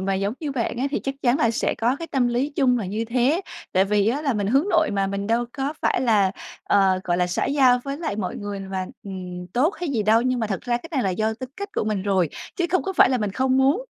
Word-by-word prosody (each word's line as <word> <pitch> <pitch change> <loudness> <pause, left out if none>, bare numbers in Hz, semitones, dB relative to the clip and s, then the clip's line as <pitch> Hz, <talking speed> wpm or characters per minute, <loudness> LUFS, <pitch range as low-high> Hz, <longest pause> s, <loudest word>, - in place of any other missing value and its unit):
mà 195 0 0
giống 200 +4 -1
như 295 -3 -3
bạn 240 -2 -2
á 260 - 0
thì - - -1
chắc 275 0 -3
chắn 250 +3 +3
là 230 - +3
sẽ 230 - 0
có 240 +4 +1
cái 330 - -6
tâm 255 -4 +1
lý 250 +5 0
chung 250 -3 +3
là 205 - -3
như 215 +5 -2
thế. 255 - +1 0.3
Tại 190 +1 +4
vì 205 +1 +2
á 280 +6 -1
là 275 -4 +1
mình 205 -2 -1
hướng 275 - +2
nội - - +3
mà 195 -1 +1
mình 200 +1 -3
đâu 235 +2 +1
có 275 +1 -2
phải - - +2
là, 210 -6 +3 0.3
ờ, 190 -2 +3
gọi 175 0 +1
là, 180 0 +2
xã 180 - -1
giao 260 -3 +4
với 275 0 -3
lại 315 -11 -3
mọi 185 -4 -3
người 205 -1 -5
và, 185 -1 -2 0.2
ừm, 180 -2 -7
tốt 300 +11 +2
hay 350 - -2
gì 230 -6 0
đâu 220 +2 +4
nhưng 255 0 0
mà 220 - 0
thật 195 -2 -3
ra 240 -1 0
cái 325 +7 -9
này 265 -4 +1
là 190 - +1
do 220 +4 0
tính 255 +2 -8
cách 405 +1 -5
của - - 0
mình 210 -3 -1
rồi, 190 -4 +1 0.3
chứ 350 - 0
không 370 - +2
có 385 - -3
phải 340 - +6
là 255 - +1
mình 210 -2 -1
không 260 +1 +1
muốn, 280 - +3
235 Hz, 290 wpm, -23 LUFS, 200-270 Hz, 0.3 s, phải